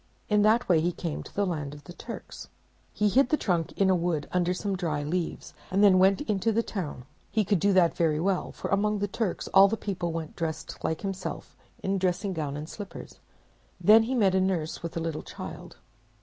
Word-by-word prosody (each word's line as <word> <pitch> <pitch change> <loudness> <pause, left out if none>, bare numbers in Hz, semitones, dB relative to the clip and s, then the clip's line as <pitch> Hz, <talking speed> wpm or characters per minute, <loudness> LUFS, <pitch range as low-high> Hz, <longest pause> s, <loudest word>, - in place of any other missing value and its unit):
In 210 -1 +4
that 220 +3 +3
way 170 -4 +4
he 175 +2 +1
came 165 -3 -4
to - - -13
the 205 - +1
land 150 -5 -3
of 145 - -13
the 175 - -11
Turks. - - -9 0.4
He 210 - +1
hid 255 +5 +4
the 305 - +3
trunk 170 - 0
in 195 - +2
a 190 - +4
wood 170 -4 -1
under 180 -1 +1
some 195 +2 -2
dry 160 -5 -2
leaves, 170 +3 -3 0.2
and 195 +2 +2
then 190 -2 +7
went 195 +7 +4
into 215 -5 0
the 230 +2 +1
town. 155 - -5 0.2
He 215 -2 +1
could 200 -1 +2
do 200 +5 +3
that 180 -3 +4
very 155 -3 +1
well, 190 +2 0
for - - -6
among 210 +2 +1
the 205 0 -1
Turks 205 -2 -2
all 195 +1 +7
the 225 +3 -1
people 180 -5 -3
went 165 -1 -4
about - - -26
dressed 160 -1 -4
like 160 - -1
himself 195 -2 -5 0.3
in 195 0 0
dressing 185 +2 0
gown 145 -4 -3
and 150 +1 -6
slippers. 205 +3 -9 0.6
Then 220 +2 +7
he 245 +4 -1
met 200 -6 +3
a 190 - +3
nurse 180 -5 -1
with 170 0 -5
a - - 0
little 165 -2 -3
child. - - -9
185 Hz, 220 wpm, -27 LUFS, 165-205 Hz, 0.6 s, then